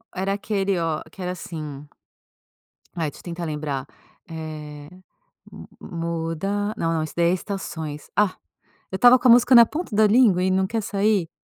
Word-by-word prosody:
Era 195 Hz, +1 st, -1 dB
aquele, 200 Hz, -2 st, -1 dB
oh, 160 Hz, -2 st, -1 dB
que 190 Hz, -, -12 dB
era 180 Hz, 0 st, -2 dB
assim 150 Hz, -5 st, -7 dB, 1.1 s
Ai, 160 Hz, -3 st, -1 dB
deixa -, -, -15 dB
eu -, -, -19 dB
tentar 170 Hz, 0 st, -5 dB
lembrar, 150 Hz, -3 st, -4 dB, 0.4 s
eh, 155 Hz, -2 st, -8 dB, 0.6 s
hum -, -, -10 dB, 0.2 s
hum. -, -, -9 dB
"Muda" 170 Hz, +5 st, -2 dB
Não 165 Hz, -5 st, -1 dB
não, 160 Hz, -, 0 dB
isso 155 Hz, -, -6 dB
daí 170 Hz, 0 st, +3 dB
é -, -, +2 dB
Estações. 160 Hz, -6 st, -6 dB
Ah, 205 Hz, -3 st, +2 dB, 0.6 s
eu 190 Hz, -, -2 dB
estava 245 Hz, +3 st, +7 dB
com 255 Hz, -, +2 dB
a 240 Hz, -, +8 dB
música 245 Hz, +1 st, +6 dB
na 235 Hz, -, +10 dB
ponta 300 Hz, -3 st, -5 dB
da 215 Hz, 0 st, +5 dB
língua 205 Hz, -5 st, +4 dB
e 185 Hz, -, +1 dB
não 190 Hz, 0 st, +1 dB
quer 225 Hz, +1 st, -2 dB
sair. 200 Hz, -4 st, +1 dB
180 Hz, 185 wpm, -23 LUFS, 160-205 Hz, 1.1 s, na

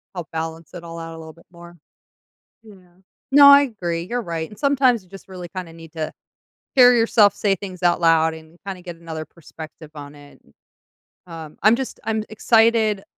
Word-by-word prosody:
Help 175 Hz, -3 st, -7 dB
balance 160 Hz, 0 st, -6 dB
it 175 Hz, -2 st, -9 dB
all 165 Hz, 0 st, -8 dB
out 165 Hz, 0 st, -8 dB
a -, -, -11 dB
little 160 Hz, -1 st, -11 dB
bit 170 Hz, -, -22 dB
more. 175 Hz, 0 st, -14 dB, 0.9 s
Yeah. 215 Hz, -2 st, -15 dB, 0.6 s
No, 285 Hz, 0 st, +9 dB
I 280 Hz, 0 st, +9 dB
agree, 175 Hz, -10 st, -3 dB
you're 240 Hz, +8 st, -3 dB
right, 165 Hz, -4 st, -4 dB
and 210 Hz, -, -15 dB
sometimes 265 Hz, -5 st, +2 dB
you 185 Hz, -, -25 dB
just 195 Hz, 0 st, -13 dB
really 180 Hz, -2 st, -9 dB
kinda 180 Hz, -2 st, -8 dB
need 165 Hz, -1 st, -14 dB
to 160 Hz, -2 st, -5 dB, 0.6 s
hear 250 Hz, -2 st, +7 dB
yourself 225 Hz, -3 st, +4 dB
say 200 Hz, -2 st, +1 dB
things 185 Hz, -2 st, -9 dB
out 175 Hz, -1 st, +2 dB
loud 160 Hz, -1 st, +3 dB
and 160 Hz, +1 st, -15 dB
kinda 190 Hz, -2 st, -6 dB
get 175 Hz, -2 st, -9 dB
another 165 Hz, -1 st, -7 dB
perspective 155 Hz, -1 st, -13 dB
on 145 Hz, -1 st, -10 dB
it. 145 Hz, -1 st, -17 dB, 0.9 s
Um, 160 Hz, -3 st, -10 dB
I'm 215 Hz, +3 st, +6 dB
just 265 Hz, +1 st, -6 dB
I'm 220 Hz, 0 st, -2 dB
excited 220 Hz, -2 st, +2 dB
175 Hz, 185 wpm, -21 LUFS, 165-220 Hz, 0.9 s, No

